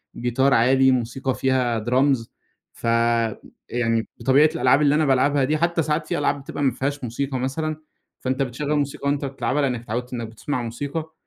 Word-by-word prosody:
جيتار 130 Hz, +3 st, +1 dB
عادي، 130 Hz, +3 st, +4 dB
موسيقى 130 Hz, +2 st, -1 dB
فيها 125 Hz, -4 st, 0 dB
drums 130 Hz, -1 st, +2 dB, 0.5 s
فيعني 115 Hz, 0 st, -1 dB
بطبيعة 135 Hz, +6 st, +4 dB
الألعاب 130 Hz, 0 st, +3 dB
اللي 145 Hz, 0 st, +4 dB
أنا 155 Hz, 0 st, +2 dB
بالعبها 140 Hz, +1 st, +3 dB
دي 155 Hz, +3 st, +1 dB
حتى 170 Hz, 0 st, +1 dB
ساعات 155 Hz, +1 st, -1 dB
في 175 Hz, -, -1 dB
ألعاب 145 Hz, -1 st, 0 dB
بتبقى 145 Hz, +1 st, -5 dB
ما 130 Hz, -, +3 dB
فيهاش 135 Hz, +3 st, -3 dB
موسيقى 130 Hz, +3 st, -3 dB
مثلًا، 155 Hz, +4 st, -2 dB, 0.4 s
فأنت 130 Hz, +1 st, -2 dB
بتشغل 140 Hz, +4 st, -1 dB
موسيقى 140 Hz, -1 st, -2 dB
وأنت 145 Hz, 0 st, -1 dB
بتلعبها 135 Hz, +1 st, -1 dB
لأنك 125 Hz, -4 st, -1 dB
اتعودت 120 Hz, +2 st, -4 dB
إنّك 115 Hz, -2 st, -4 dB
بتسمع 125 Hz, +4 st, -4 dB
موسيقى، 145 Hz, +7 st, -5 dB
130 Hz, 165 wpm, -23 LUFS, 120-145 Hz, 0.5 s, عادي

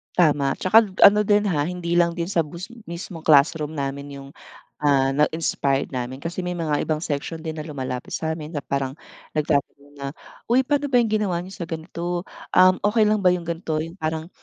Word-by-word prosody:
Tama 145 Hz, -5 st, +3 dB
'tsaka 200 Hz, +4 st, +5 dB, 0.2 s
ano 205 Hz, +1 st, +8 dB
din, 205 Hz, 0 st, +4 dB
ha, 145 Hz, -3 st, +1 dB
hindi 175 Hz, -1 st, -2 dB
lang 170 Hz, -1 st, +3 dB
din 170 Hz, 0 st, -3 dB
sa 170 Hz, -5 st, +1 dB
bus 170 Hz, +6 st, -8 dB, 0.2 s
mismong 170 Hz, -1 st, -7 dB
classroom 150 Hz, +1 st, +4 dB
namin 140 Hz, 0 st, -4 dB
'yong, 140 Hz, 0 st, -9 dB, 0.5 s
ah, 135 Hz, -2 st, +3 dB
na-inspired 145 Hz, -2 st, 0 dB
namin 130 Hz, +1 st, -4 dB
kasi 170 Hz, +3 st, -5 dB
may 180 Hz, -, -2 dB
mga 155 Hz, -4 st, -1 dB
ibang 155 Hz, -1 st, -1 dB
section 155 Hz, +2 st, -3 dB
din 160 Hz, -1 st, -5 dB
na 155 Hz, -, -5 dB
lumalapit 130 Hz, -4 st, -5 dB
sa 160 Hz, 0 st, -2 dB
amin 155 Hz, 0 st, -8 dB
na 145 Hz, -, -2 dB
parang 135 Hz, -2 st, -2 dB, 0.4 s
nagtatanong 145 Hz, -1 st, -1 dB
na, 140 Hz, 0 st, -5 dB, 0.4 s
"uy 245 Hz, +3 st, +4 dB
paano 290 Hz, +1 st, 0 dB
ba 245 Hz, -3 st, +4 dB
'yong 230 Hz, -, 0 dB
ginawa 205 Hz, -5 st, +1 dB
n'yo 185 Hz, -, -10 dB
sa 175 Hz, -, -5 dB
ganito, 170 Hz, +1 st, -4 dB, 0.3 s
um, 185 Hz, 0 st, +7 dB
okey 215 Hz, +1 st, +4 dB
lang 215 Hz, 0 st, +2 dB
ba 180 Hz, -, +6 dB
'yong 175 Hz, -2 st, -4 dB
ganito 165 Hz, -2 st, -2 dB
'yong 165 Hz, +3 st, -7 dB
parang 160 Hz, +1 st, -3 dB
160 Hz, 195 wpm, -23 LUFS, 145-180 Hz, 0.5 s, ano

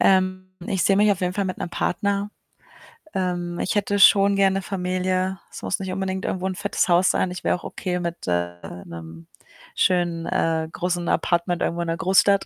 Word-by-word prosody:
Ähm, 185 Hz, 0 st, +2 dB
ich 190 Hz, -3 st, 0 dB
sehe 195 Hz, -, +4 dB
mich 210 Hz, +1 st, +5 dB
auf 195 Hz, -, -5 dB
jeden 180 Hz, -1 st, 0 dB
Fall 200 Hz, -, 0 dB
mit 185 Hz, -1 st, -4 dB
'nem 175 Hz, -, -4 dB
Partner. 200 Hz, +3 st, -1 dB, 0.8 s
Ähm, 175 Hz, -2 st, -2 dB
ich -, -, -1 dB
hätte 205 Hz, 0 st, +1 dB
schon 200 Hz, 0 st, +6 dB
gerne 195 Hz, 0 st, +3 dB
Familie. 185 Hz, 0 st, -1 dB
Es -, -, -9 dB
muss 195 Hz, -, -1 dB
nicht 190 Hz, -1 st, -4 dB
unbedingt 190 Hz, 0 st, -3 dB
irgendwo 185 Hz, 0 st, -2 dB
'n 185 Hz, -, -3 dB
fettes 205 Hz, -, 0 dB
Haus 175 Hz, +1 st, +5 dB
sein, 185 Hz, -, 0 dB
ich 180 Hz, 0 st, -7 dB
wäre -, -, +2 dB
auch 175 Hz, -, -9 dB
okay 180 Hz, -1 st, -3 dB
mit, 170 Hz, -1 st, -5 dB
äh, 85 Hz, 0 st, 0 dB, 0.3 s
'nem 80 Hz, -1 st, -10 dB, 0.5 s
schönen, 175 Hz, -2 st, +1 dB
äh, 160 Hz, -1 st, 0 dB
großen 175 Hz, 0 st, -2 dB
Apartment 175 Hz, +1 st, +1 dB
irgendwo 170 Hz, +1 st, -1 dB
in 170 Hz, -, -3 dB
'ner 165 Hz, 0 st, -1 dB
Großstadt. 195 Hz, +3 st, +3 dB
185 Hz, 195 wpm, -23 LUFS, 175-195 Hz, 0.8 s, schon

